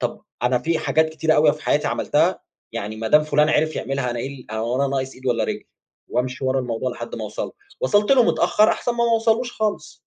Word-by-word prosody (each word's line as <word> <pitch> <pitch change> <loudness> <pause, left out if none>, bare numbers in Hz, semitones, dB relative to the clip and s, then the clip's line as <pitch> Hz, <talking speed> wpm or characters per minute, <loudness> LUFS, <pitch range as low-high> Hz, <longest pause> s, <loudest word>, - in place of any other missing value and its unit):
طَب - - -3 0.2
أنا 125 +1 +2
في 165 +6 -1
حاجات 160 0 +2
كتيرة 160 0 +1
أوي 150 0 +5
في 155 +1 -10
حياتي - - +1
عملتَها، - - +1 0.3
يعني 105 +2 -5
ما 110 0 -3
دام 150 +6 +6
فُلان 150 0 +2
عرف 155 +1 +1
يعملها 135 -2 -2
أنا 120 - -4
إيه 130 - -3
ال - - -16
هو 115 +3 -1
أنا 140 +1 +2
ناقص 135 -1 -2
إيد 130 +1 -11
والّا 120 -2 +1
رجلّ؟ - - -4 0.5
وأمشي 125 +2 -2
ورا 130 0 +1
الموضوع 125 +1 -2
لحدّ 120 -1 -7
ما 110 - -4
أوصل 105 - -4
له. - - -12 0.3
وصَلت 205 +5 +3
له 255 -3 +6
متأخر 215 0 +3
أحسن 245 - 0
ما 235 0 0
ما 235 - +2
أوصلوش 225 +2 +1
خالِص. 215 -1 -3
135 Hz, 230 wpm, -22 LUFS, 125-160 Hz, 0.5 s, دام